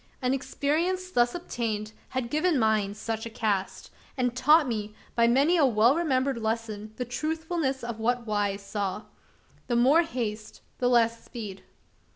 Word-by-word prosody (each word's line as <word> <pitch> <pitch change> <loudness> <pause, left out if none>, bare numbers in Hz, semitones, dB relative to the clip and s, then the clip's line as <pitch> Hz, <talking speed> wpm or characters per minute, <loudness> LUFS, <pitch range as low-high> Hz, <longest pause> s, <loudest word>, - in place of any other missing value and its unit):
An 255 -1 +1
experience 335 +7 -1
thus 240 -3 +2
obtained, 225 -10 -3 0.2
had 250 -2 -3
given 310 +1 +2
mine 215 -3 +1
such 225 +1 -4
a - - -7
cast; 210 -4 -2 0.3
and 250 -2 0
taught 300 +4 +5
me, 215 -3 -3 0.2
by 235 0 +4
many 280 +9 +4
a 305 - +5
well 235 +3 +4
remembered 270 -6 +1
lesson, 220 -1 -3
the 250 - -3
truthfulness 310 +1 -2
of 235 -2 -5
that 240 +1 0
wise 205 -2 -1
saw; 200 0 -3 0.6
"The 240 - 0
more 265 +8 +5
haste 225 -9 -4 0.2
the 245 - +2
less 230 -1 +3
speed." 205 -6 -8
240 Hz, 155 wpm, -27 LUFS, 215-275 Hz, 0.6 s, taught